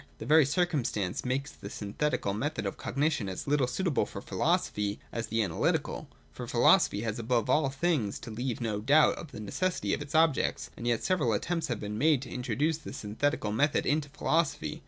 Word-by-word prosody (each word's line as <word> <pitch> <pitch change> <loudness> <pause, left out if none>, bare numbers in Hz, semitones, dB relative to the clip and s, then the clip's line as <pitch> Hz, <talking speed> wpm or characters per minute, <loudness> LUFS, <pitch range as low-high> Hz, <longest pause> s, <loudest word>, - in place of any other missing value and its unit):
This - - -7
very 155 -2 +6
circumstance 140 - 0
makes 135 +3 -2
the - - -10
synthetical 105 0 -2
method 140 +9 -2
of - - -2
cognition 140 -8 -1
as 95 - -5
little 140 -3 +2
suitable 170 -2 0
for - - -7
philosophy 105 0 0
as 115 -1 -3
the 115 +1 0
analjrtical: 90 -6 -1 0.2
for - - -7
philosophy 100 - +4
has 110 0 -3
above 120 +1 +1
all 145 0 +3
things 135 - 0
to 115 - -8
leave 120 +2 -3
no 110 -3 -1
doubt 145 +8 +5
of 165 - -9
the - - -8
necessity 105 - -1
of - - -2
its 145 +1 -6
objects. 160 -3 +2
And 120 - -5
yet 120 -2 +1
several 155 -12 +1
attempts 165 +10 -1
have 120 -4 -2
been 105 +1 -4
made 145 -1 +3
to 125 - -9
introduce 135 +6 -1
the - - -9
syn 105 0 -7
thetical 145 -8 0
method 145 +6 +2
into 145 0 0
philosophy. 145 - -1
130 Hz, 195 wpm, -29 LUFS, 110-150 Hz, 0.2 s, very